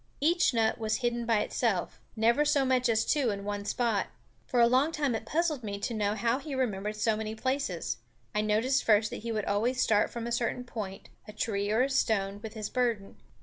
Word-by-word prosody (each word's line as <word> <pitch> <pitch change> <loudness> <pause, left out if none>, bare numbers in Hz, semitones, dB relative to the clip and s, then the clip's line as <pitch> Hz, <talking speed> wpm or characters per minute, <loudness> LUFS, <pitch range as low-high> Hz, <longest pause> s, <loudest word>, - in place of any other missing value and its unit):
Each 340 +5 +3
nut 225 -1 +1
was 220 -1 0
hidden 240 -1 -1
by 225 -3 +3
itself; 215 -7 -1 0.2
never 235 +6 +3
so 290 -2 +2
much 255 -1 +2
as 225 -1 +2
two 280 -5 +2
in 200 -1 -3
one 205 0 -3
spot. 230 -2 0 0.4
For 250 - +1
a 235 - +7
long 260 +6 +3
time 290 -5 0
it 225 0 -4
puzzled 310 -3 0
me 200 -2 -4
to 200 +4 -3
know 210 -1 0
how 230 +4 +1
he 285 -1 -6
remembered 210 -5 -1
so 215 +1 +1
many 215 0 -4
places. 220 - -2 0.4
I 210 - +1
noticed 225 +6 +1
first 215 0 +3
that - - -4
he 230 +1 -4
would 215 -2 -2
always 230 +6 0
start 215 -4 +3
from 235 -1 -5
a 235 - -4
certain 240 +1 -1
point, 210 -5 -7 0.2
a 210 - -9
tree 205 -2 -1
or 220 +4 +3
a 270 - 0
stone, 205 -6 +1
with 220 0 -8
his 215 -1 -3
burden. 235 -6 -1
225 Hz, 220 wpm, -29 LUFS, 210-255 Hz, 0.4 s, a